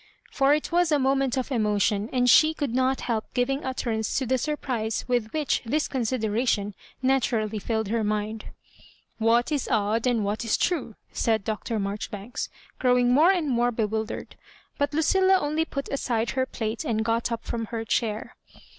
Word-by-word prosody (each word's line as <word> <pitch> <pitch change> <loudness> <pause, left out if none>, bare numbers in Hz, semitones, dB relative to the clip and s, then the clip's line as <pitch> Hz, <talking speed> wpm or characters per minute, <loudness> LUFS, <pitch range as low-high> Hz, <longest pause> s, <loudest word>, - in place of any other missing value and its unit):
For 275 0 +3
it 305 - -4
was 350 -1 +2
a 300 - +4
moment 270 -1 +1
of 260 +1 -2
emotion, 210 -2 +1
and 250 -1 +2
she 310 +5 +6
could 285 -7 -2
not 260 +1 +1
help 225 -3 -1
giving 270 +3 0
utterance 230 -4 -2
to 265 - 0
the 260 +1 +1
surprise 240 -7 -2
with 240 -3 0
which 305 -2 0
this 295 +7 0
consideration 225 -4 0 0.3
naturally 230 -5 +1
filled 220 0 -2
her 225 0 0
mind. 215 +1 -2 0.7
What 230 +4 +3
is 290 -4 -1
odd, 220 +1 +1
and 230 -4 +1
what 210 +3 -2
is 225 - +1
true 275 - -1
?" - - -37
said 220 -3 +1
Dr. 220 +2 -3
Maijoribanks, 205 +2 -4 0.3
growing 250 -1 +3
more 310 +7 +6
and 350 -5 0
more 245 -2 +2
bewil 220 -1 -1
dered. - - -6 0.5
But 285 - +1
Lucilla 375 +5 +4
only 305 +1 0
put 275 -3 -5
aside 235 -4 -1
her 260 -1 0
plate 225 -2 -3
and 220 -1 -1
got 230 +1 0
up 230 -1 -3
from 230 -1 -3
her 225 0 -5
chair. 215 -1 -1
240 Hz, 175 wpm, -26 LUFS, 220-270 Hz, 0.7 s, she